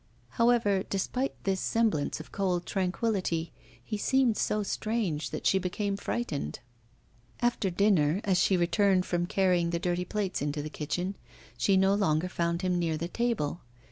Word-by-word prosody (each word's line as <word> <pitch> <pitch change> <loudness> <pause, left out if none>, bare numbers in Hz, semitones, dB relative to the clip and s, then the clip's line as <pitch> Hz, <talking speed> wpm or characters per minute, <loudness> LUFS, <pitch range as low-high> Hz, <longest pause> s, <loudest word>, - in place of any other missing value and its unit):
However, 230 -5 +3
despite 250 +7 -1
this 190 -1 0
semblance 215 -13 +1
of 155 - -10
cold 180 -3 -1
tranquillity, 185 -3 -1 0.3
he 215 -2 -4
seemed 260 -1 +3
so 210 0 0
strange 205 -7 -2
that - - -6
she 190 - +4
became 195 +2 -2
frightened. 195 - -3 0.8
After 240 -5 +1
dinner, 180 -3 +3
as 190 -3 +2
she 185 +1 +3
returned 185 +1 +3
from 175 0 -1
carrying 180 -3 +2
the 170 - 0
dirty 175 +1 -1
plates 200 -1 -2
into 145 0 -2
the 155 - -6
kitchen, 175 +7 -3 0.4
she 140 +11 +3
no 190 +1 +4
longer 180 -4 +1
found 170 0 -1
him 180 -1 +1
near 165 -2 0
the 170 - -3
table. 225 -9 -1
185 Hz, 155 wpm, -29 LUFS, 170-205 Hz, 0.8 s, she